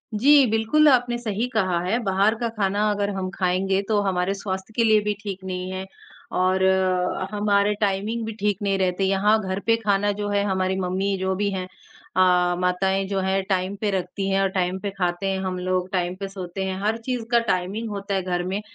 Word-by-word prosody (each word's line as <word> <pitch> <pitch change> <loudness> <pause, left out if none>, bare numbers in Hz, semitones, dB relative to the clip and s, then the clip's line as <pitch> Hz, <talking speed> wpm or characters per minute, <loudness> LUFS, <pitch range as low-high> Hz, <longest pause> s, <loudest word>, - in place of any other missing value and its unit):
जी 280 +4 +6
बिल्कुल, 225 +8 +3
आपने 245 -2 +2
सही 230 0 -2
कहा 185 -5 +1
है। 195 +6 +1
बाहर 200 +2 +2
का 235 - 0
खाना 205 +1 +1
अगर 205 0 -1
हम 185 -1 -3
खाएँगे 190 +1 +1
तो 215 -2 +2
हमारे 190 -1 0
स्वास्थ्य 195 +1 -5
के 230 - +3
लिए 220 -1 +5
भी 210 0 0
ठीक 195 -2 -6
नहीं 185 0 -4
है 190 0 -4 0.5
और 185 +1 +2 0.7
हमारे 205 0 +2
टाइमिंग 205 +3 0
भी 225 - -4
ठीक 205 0 0
नहीं 200 -1 +1
रहते। 185 0 0
यहाँ 195 +3 +3
घर 190 -1 -3
पे 230 - +4
खाना 205 -2 +1
जो 205 0 -2
है 200 0 +1
हमारी 190 -1 0
मम्मी 190 +2 -1
जो 190 0 -1
भी 200 +1 0
हैं, 185 -1 -3 0.5
अ, 180 -1 +4
माताएँ 190 +2 +1
जो 195 0 -1
हैं 190 +1 +1
टाइम 190 0 0
पे 210 -2 +1
रखती 195 +1 -2
हैं 195 0 +2
और 195 - +2
टाइम 185 0 -1
पे 200 - -3
खाते 180 0 -1
हैं 190 - -2
हम 185 -1 -3
लोग, 185 0 -1
टाइम 180 -1 -1
पे 195 - -3
सोते 190 -1 -6
हैं। 190 0 -3
हर 215 +2 0
चीज़ 250 -3 -2
का 235 - +5
टाइमिंग 195 +5 -2
होता 200 -1 -3
है 190 - +1
घर 175 -1 -1
में। 190 +3 -2
195 Hz, 210 wpm, -23 LUFS, 185-210 Hz, 0.7 s, जी